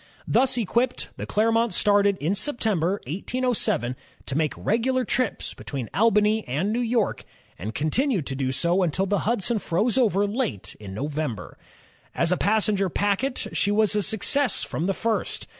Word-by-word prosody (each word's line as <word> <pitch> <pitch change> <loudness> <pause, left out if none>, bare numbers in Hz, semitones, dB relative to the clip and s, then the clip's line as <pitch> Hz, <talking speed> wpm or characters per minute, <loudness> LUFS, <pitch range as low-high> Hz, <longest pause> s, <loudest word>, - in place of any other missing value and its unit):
Thus 260 -1 +3
equipped, 235 +3 0
the - - -6
Clermont 225 -1 +1
started 205 -1 +3
in 165 +4 -1
September, 200 - +1
1807, 200 - -1 0.3
to 135 - -2
make 155 -1 0
regular 250 +4 0
trips 255 -4 -1
between 130 -6 -6
Albany 215 0 +3
and 170 - -1
New 235 - 0
York, 235 -3 0 0.4
and 105 +6 -5
continued 190 - 0
to 135 - -3
do 130 -1 -1
so 170 +7 +1
until 180 +2 +1
the 205 +1 0
Hudson 235 0 +1
froze 215 +9 +1
over 205 -5 +2
late 205 - -3
in 100 -2 -8
November. 145 -1 -4 0.6
As 170 +1 +2
a 180 - +2
passenger 205 -1 +2
packet, 205 - -1
she 200 - +1
was 210 0 +3
a 210 - +2
success 240 - +2
from 165 - -3
the 195 - 0
first. 225 -1 -2
205 Hz, 160 wpm, -24 LUFS, 165-230 Hz, 0.6 s, Thus